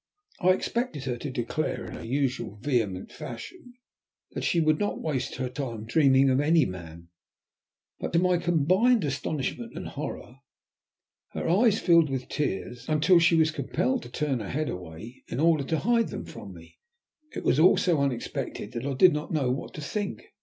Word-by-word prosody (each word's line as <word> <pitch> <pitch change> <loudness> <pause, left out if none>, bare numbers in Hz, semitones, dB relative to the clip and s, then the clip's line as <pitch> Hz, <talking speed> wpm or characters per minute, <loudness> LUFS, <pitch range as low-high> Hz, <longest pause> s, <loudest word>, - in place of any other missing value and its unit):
I 185 - 0
expected 185 - 0
her 130 -3 -2
to 145 - -4
declare 130 +4 -2
in - - -8
her - - -8
usual 125 -3 -1
vehement 105 -6 -1
fashion 330 -10 -9 0.6
that - - -5
she 170 - +2
would 155 -1 +2
not 205 - -1
waste 140 -5 -2
her 130 0 -2
time 120 -4 -5
dreaming 135 +1 +4
of 130 - +2
any 155 +1 +4
man, 85 -2 -8 0.9
but - - -4
to - - +4
my 180 +1 +3
combined 180 - +3
astonishment 135 0 -3
and - - -5
horror 125 - -6 1.0
her - - -3
eyes 210 +5 +4
filled 170 -4 +4
with 130 -2 -4
tears, 125 -2 -3
until 155 +4 +5
she 165 +1 +4
was 160 -1 +4
compelled 135 -3 -1
to 120 - -10
turn 135 0 -1
her 105 - -6
head 150 +2 -1
away 90 +7 -8
in 120 - -4
order 160 -2 +3
to 160 - 0
hide 230 +5 +2
them - - -6
from - - -10
me. - - -15 0.6
It - - -4
was 140 - +2
all 175 +4 +6
so 170 -5 +2
unexpected 135 -4 -3
that 120 +4 -4
I 140 - -1
did 175 +7 +6
not 150 0 -4
know 140 -6 +1
what 130 - -5
to 150 - -6
think. 205 +6 -5
145 Hz, 180 wpm, -27 LUFS, 125-170 Hz, 1.0 s, all